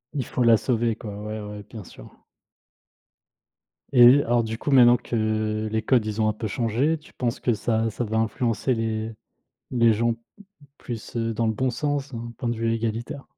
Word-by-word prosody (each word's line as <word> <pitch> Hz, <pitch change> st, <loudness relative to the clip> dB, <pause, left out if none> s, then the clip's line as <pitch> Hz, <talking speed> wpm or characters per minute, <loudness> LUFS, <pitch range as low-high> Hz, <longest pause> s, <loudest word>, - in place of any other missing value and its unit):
Il 135 Hz, -4 st, -1 dB
faut 125 Hz, -, -1 dB
la 115 Hz, -2 st, +6 dB
sauver 115 Hz, -2 st, 0 dB
quoi, 105 Hz, -3 st, -8 dB
ouais, 110 Hz, 0 st, -5 dB
ouais, 105 Hz, 0 st, -8 dB
bien 110 Hz, -3 st, -8 dB
sûr. -, -, -13 dB, 1.8 s
Et 125 Hz, +2 st, +7 dB
alors 120 Hz, 0 st, +2 dB
du 110 Hz, 0 st, -4 dB
coup 145 Hz, -, -3 dB
maintenant 120 Hz, -2 st, +7 dB
que 110 Hz, -2 st, -1 dB
les 110 Hz, 0 st, 0 dB
codes, 115 Hz, -1 st, +2 dB
ils 110 Hz, +1 st, -2 dB
ont 110 Hz, -, +3 dB
un -, -, 0 dB
peu 110 Hz, +1 st, -4 dB
changé, 120 Hz, +9 st, 0 dB
tu 150 Hz, -, -19 dB
penses 120 Hz, -2 st, -2 dB
que 120 Hz, -, +2 dB
ça 110 Hz, +1 st, 0 dB
ça 115 Hz, +3 st, -4 dB
va 110 Hz, +1 st, -2 dB
influencer 115 Hz, +2 st, 0 dB
les 110 Hz, -1 st, -2 dB, 0.6 s
les 115 Hz, -2 st, +4 dB
gens 115 Hz, +2 st, +1 dB, 0.7 s
plus, 120 Hz, 0 st, -7 dB
heu, 115 Hz, 0 st, -1 dB
dans 115 Hz, +1 st, 0 dB
le 110 Hz, -, +1 dB
bon 130 Hz, +4 st, 0 dB
sens, 140 Hz, +1 st, -2 dB
hein, 115 Hz, 0 st, -6 dB
point 120 Hz, -, -2 dB
de 120 Hz, -, -1 dB
vue 115 Hz, 0 st, 0 dB
égalitaire? 115 Hz, +5 st, -3 dB
115 Hz, 195 wpm, -24 LUFS, 110-120 Hz, 1.8 s, Et